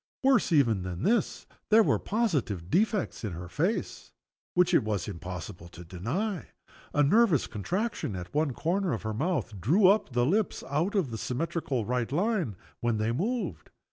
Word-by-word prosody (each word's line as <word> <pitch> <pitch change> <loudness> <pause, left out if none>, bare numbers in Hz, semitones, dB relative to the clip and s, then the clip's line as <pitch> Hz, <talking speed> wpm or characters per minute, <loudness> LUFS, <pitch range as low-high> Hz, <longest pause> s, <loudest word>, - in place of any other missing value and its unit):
Worse 265 -7 +4
even 120 - +3
than 90 0 -5
this, 230 0 +1 0.2
there 220 +1 +7
were - - +2
positive 140 - -1
defects 210 - +1
in 105 -5 -3
her 90 +1 -7
face, 175 - -2 0.4
which 180 0 +4
it - - +5
was 105 -4 -2
impossible 90 +1 -7
to 85 0 -11
deny. 145 - -3 0.4
A 145 - +3
nervous 190 - +4
contraction 180 - -3
at 90 0 -7
one 150 -1 +1
corner 175 +5 0
of 110 - -4
her 110 0 -2
mouth 120 - -2
drew 170 - +4
up 200 -1 +4
the 120 0 +2
lips 200 +8 0
out 165 +9 0
of 175 - +1
the 110 - -4
symmetrically 135 -1 -2
right 125 +2 -1
line, 180 - 0 0.2
when, 120 -2 0
they 110 +2 0
moved. 220 - -2
145 Hz, 170 wpm, -28 LUFS, -, 0.4 s, there